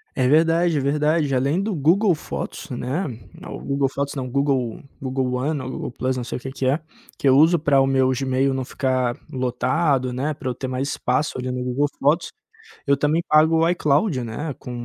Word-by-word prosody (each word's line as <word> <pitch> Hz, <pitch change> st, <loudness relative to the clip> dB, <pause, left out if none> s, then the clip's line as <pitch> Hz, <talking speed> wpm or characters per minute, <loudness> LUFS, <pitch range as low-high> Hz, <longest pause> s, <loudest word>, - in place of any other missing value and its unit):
É 130 Hz, -2 st, +2 dB
verdade, 165 Hz, +3 st, +3 dB
é -, -, +2 dB
verdade. 150 Hz, +1 st, +1 dB
Além 140 Hz, +8 st, +1 dB
do 205 Hz, -1 st, -2 dB
Google 175 Hz, +6 st, +3 dB
Fotos, 155 Hz, -, -6 dB
né? 130 Hz, +8 st, -2 dB, 0.4 s
É -, -, -9 dB
o -, -, -7 dB
Google 140 Hz, 0 st, 0 dB
Fotos, 140 Hz, +2 st, -3 dB
não, 130 Hz, -2 st, -3 dB
Google, 135 Hz, -3 st, 0 dB, 0.2 s
Google 130 Hz, -1 st, -1 dB
One 140 Hz, +3 st, -1 dB
ou 130 Hz, -, -5 dB
Google -, -, -5 dB
Plus, 130 Hz, +1 st, -2 dB
não 125 Hz, -, -3 dB
sei 120 Hz, -, -4 dB
o -, -, -20 dB
que 130 Hz, -, -6 dB
que 135 Hz, -1 st, -4 dB
é, 135 Hz, +4 st, +2 dB, 0.4 s
que 140 Hz, -, +2 dB
eu 130 Hz, -, +6 dB
uso 165 Hz, +3 st, +5 dB
pra 145 Hz, -2 st, +3 dB
o -, -, +4 dB
meu 130 Hz, -1 st, +3 dB
Gmail 135 Hz, 0 st, +1 dB
não 130 Hz, -1 st, -2 dB
ficar 130 Hz, -2 st, -1 dB, 0.2 s
lotado, 130 Hz, +2 st, 0 dB
né? 140 Hz, +5 st, -2 dB
Pra 140 Hz, -3 st, -5 dB
eu 125 Hz, -, -3 dB
ter 130 Hz, -, -5 dB
mais 130 Hz, +2 st, -2 dB
espaço 130 Hz, +1 st, -1 dB
ali 130 Hz, 0 st, -3 dB
no 125 Hz, 0 st, -3 dB
Google 125 Hz, +4 st, 0 dB
Fotos. 150 Hz, +5 st, +1 dB, 0.5 s
Eu 140 Hz, -, +4 dB
também 150 Hz, +4 st, +1 dB
pago 155 Hz, +2 st, +5 dB
o 165 Hz, -, +3 dB
iCloud, 150 Hz, -2 st, +1 dB
né. 140 Hz, +7 st, -4 dB
Com 125 Hz, -, -8 dB
135 Hz, 215 wpm, -22 LUFS, 130-155 Hz, 0.5 s, eu